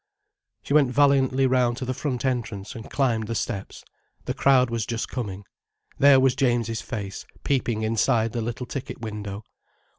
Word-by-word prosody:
She - - -3
went 145 -4 +5
valiantly 135 -1 +3
round 125 -2 +2
to 130 - -4
the 130 - -2
front 130 -1 -3
entrance, 110 -6 -2
and 115 -1 -9
climbed 115 -6 0
the 115 - -3
steps. 100 -2 -4 0.4
The - - -2
crowd 130 -3 +3
was 115 -2 -2
just 115 -1 -3
coming. 105 -6 -5 0.6
There 140 -1 +7
was 130 -1 +4
James's 120 -4 0
face 100 -6 -6 0.2
peeping 120 -5 0
inside 115 +1 +1
the 120 - -2
little 120 +2 -4
ticket 130 +1 -6
window. 105 -2 -6
120 Hz, 160 wpm, -25 LUFS, 110-130 Hz, 0.6 s, There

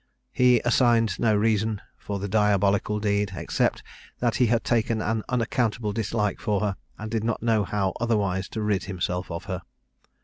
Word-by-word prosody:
He 125 -1 +4
assigned 120 -2 +3
no 110 -2 +3
reason 110 0 +1 0.2
for 100 - -5
the 100 +1 -4
diabolical 100 0 +2
deed, 100 -1 0
except - - -1 0.3
that 120 -2 0
he 125 - +4
had 115 +1 +1
taken 115 -1 +1
an 110 +1 -1
unaccountable 115 -3 0
dislike 105 -1 -1
for 105 -3 0
her, 105 -3 0 0.2
and 110 0 -6
did 115 -2 -1
not 115 -1 -2
know 110 -3 +2
how 95 -2 -1
otherwise 100 -5 0
to 110 - -4
rid 105 -3 0
himself 90 -1 -3
of 85 +2 -5
her. 95 0 -4
105 Hz, 170 wpm, -25 LUFS, 100-115 Hz, 0.3 s, He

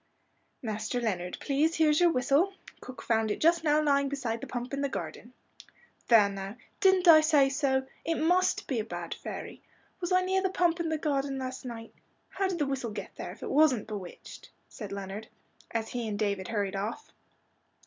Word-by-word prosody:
"Master 220 +2 -2
Leonard, 180 -6 -2
please, 305 +4 +1
here's 305 -2 +4
your 350 -1 +6
whistle. 285 +7 +2 0.3
Cook 255 - -10
found 220 -1 +1
it 210 - -2
just 335 +1 +3
now 300 -1 +4
lying 280 -1 +2
beside 235 -5 -3
the - - -6
pump 245 +2 -5
in 275 - -1
the 280 - 0
garden." 240 -2 -6 0.8
"There 225 -4 +7
now 195 +2 -6 0.2
didn't 380 -2 +4
I 315 -2 +10
say 300 -3 +4
so? 270 -1 +1 0.2
It 330 - 0
must 365 +4 +2
be 255 -5 -1
a - - -1
bad 225 - -5
fairy. - - -7 0.4
Was 350 -1 -3
I 365 0 +5
near 380 +1 +1
the 380 - +1
pump 350 -2 +1
in 335 -1 -1
the 315 - 0
garden 280 -3 -1
last 260 0 -5
night? 230 -2 -7 0.4
How 390 - -1
did 375 -2 -2
the 295 - +1
whistle 270 -4 -2
get 205 -2 -7
there, - - -6
if - - -13
it - - -4
wasn't 280 -6 +4
bewitched?" 200 -5 -8 0.2
said 210 -4 -8
Leonard, 200 +2 -6 0.4
as 225 -1 -2
he 240 -2 -3
and 210 -1 -3
David 200 -3 -1
hurried 205 -3 -2
off. 215 - -4
265 Hz, 195 wpm, -29 LUFS, 220-315 Hz, 0.8 s, I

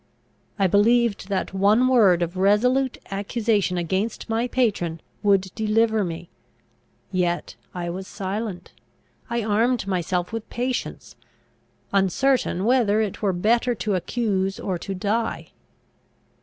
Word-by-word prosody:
I 195 - +2
believed 210 +2 +2
that 195 -1 -2
one 205 +6 +4
word 200 -9 +4
of 170 +2 -4
resolute 250 +7 +2
accusation 205 -1 0
against 190 +6 -2
my 225 +2 0
patron 200 -10 0 0.2
would 195 -2 +2
deliver 220 0 +2
me; 170 -1 -6 0.8
yet 175 -2 -1 0.2
I 175 -1 -3
was 190 +2 -6
silent, 195 -2 -5 0.6
I 235 -1 -1
armed 225 +3 +1
myself 180 0 -2
with 225 -1 -5
patience, 250 +1 -4 0.8
uncertain 200 +1 +1
whether 230 -4 +3
it 215 -3 -2
were 200 -2 +2
better 230 +7 +1
to 210 -1 -2
accuse 195 0 -1
or 185 -3 -3
to 195 - -5
die. 215 +5 -2
205 Hz, 120 wpm, -23 LUFS, 185-230 Hz, 0.8 s, one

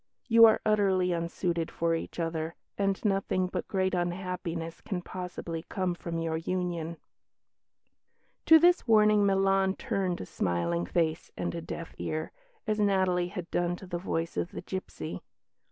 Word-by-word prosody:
You 230 -1 +8
are 220 - +5
utterly 195 -4 +3
unsuited 170 0 -1
for 170 0 0
each 165 - -4
other, 165 -1 -2 0.2
and 195 -1 0
nothing 195 -2 +1
but 180 0 -4
great 190 -1 0
unhappiness 175 -2 -3
can 185 -5 -4
possibly 180 -3 -5
come 185 -2 -1
from 170 -1 -5
your 165 -1 -1
union." 170 -1 -2 1.5
To 320 - +10
this 350 -1 +4
warning 210 -2 +5
Milan 195 0 +3
turned 185 -3 -1
a - - -5
smiling 85 -1 -1
face 160 - 0
and - - -2
a 170 - -4
deaf 165 0 -7
ear, 155 0 -3 0.3
as 215 -1 0
Natalie 185 -3 +2
had 180 -2 -7
done 175 0 +1
to 190 - -11
the 175 -1 -4
voice 165 -2 -2
of 175 - -2
the - - -5
gipsy. 185 - -5
180 Hz, 155 wpm, -29 LUFS, 165-195 Hz, 1.5 s, To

